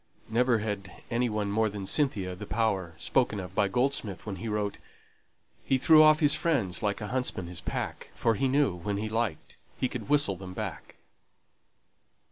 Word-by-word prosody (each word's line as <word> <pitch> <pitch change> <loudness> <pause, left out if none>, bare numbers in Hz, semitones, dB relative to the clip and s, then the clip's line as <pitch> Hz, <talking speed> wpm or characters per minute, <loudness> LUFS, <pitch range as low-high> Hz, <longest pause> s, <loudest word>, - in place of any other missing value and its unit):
Never 120 +1 +3
had 105 -2 -5
any 120 +1 +1
one 105 -2 -2
more 110 +1 +2
than 100 -1 -6
Cynthia 100 -7 0
the 105 +3 -8
power 95 -8 -1
spoken 120 -6 +1
of 90 -1 -7
by 100 - +2
Goldsmith 120 -3 -1
when 100 -3 -5
he 115 - -6
wrote 105 -1 -2 0.8
He 135 - +2
threw 155 +4 +7
off 155 +1 +6
his 145 -1 +5
friends 135 - 0
like 105 -1 -1
a 105 - -4
huntsman 125 -8 -2
his 85 0 -6
pack, - - -4
For 115 - +2
he 135 +5 0
knew 135 -5 +2
when 95 +4 -3
he 110 +1 -3
liked 110 -7 -3 0.2
he 130 - +1
could 125 0 -7
whistle 145 -9 +4
them 90 0 -9
back. - - -6
110 Hz, 180 wpm, -28 LUFS, 100-125 Hz, 0.8 s, threw